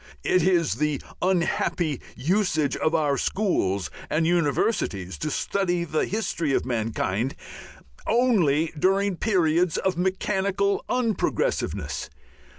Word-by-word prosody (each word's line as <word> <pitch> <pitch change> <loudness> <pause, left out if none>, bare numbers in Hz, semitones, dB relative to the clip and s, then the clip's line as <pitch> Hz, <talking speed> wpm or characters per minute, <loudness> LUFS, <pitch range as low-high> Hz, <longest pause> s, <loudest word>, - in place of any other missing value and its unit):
It 185 - +3
is 170 - +2
the 150 -3 +1 0.2
unhappy 175 -4 0
usage 155 - +1
of 155 +1 0
our 145 -4 +1
schools 100 - 0 0.2
and 160 +1 +1
universities 145 - 0
to 155 - -2
study 175 +3 0
the 155 -2 0
history 170 -8 -1
of - - 0
mankind 115 0 -1 0.7
only 180 - +2
during 195 +2 +2
periods 175 -5 +2
of 190 -2 0
mechanical 195 +1 0
unprogressiveness. 250 - -1
170 Hz, 105 wpm, -25 LUFS, 145-195 Hz, 0.7 s, It